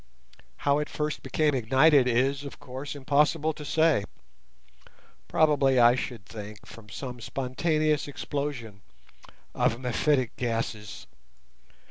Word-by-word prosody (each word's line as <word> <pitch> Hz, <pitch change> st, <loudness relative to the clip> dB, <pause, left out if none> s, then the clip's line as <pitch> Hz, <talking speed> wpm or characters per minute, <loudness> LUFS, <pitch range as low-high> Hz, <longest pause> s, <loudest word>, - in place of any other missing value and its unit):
How 140 Hz, 0 st, +3 dB
it 150 Hz, -, -5 dB
first 150 Hz, 0 st, -3 dB
became 155 Hz, -2 st, +1 dB
ignited 135 Hz, +3 st, +4 dB
is, 135 Hz, +3 st, +1 dB
of 140 Hz, -, -9 dB
course, 135 Hz, +3 st, -7 dB
impossible 150 Hz, +3 st, +1 dB
to 150 Hz, -, -9 dB
say—probably, 135 Hz, -, -1 dB
I 120 Hz, 0 st, +7 dB
should 120 Hz, -4 st, -5 dB
think, 105 Hz, -1 st, -9 dB
from 110 Hz, -2 st, -13 dB
some 125 Hz, +1 st, -7 dB
spontaneous 150 Hz, +5 st, 0 dB
explosion 135 Hz, -7 st, -5 dB, 0.7 s
of 115 Hz, -, +1 dB
mephitic 130 Hz, 0 st, 0 dB
gases. 115 Hz, -3 st, -3 dB
130 Hz, 105 wpm, -27 LUFS, 115-150 Hz, 0.7 s, I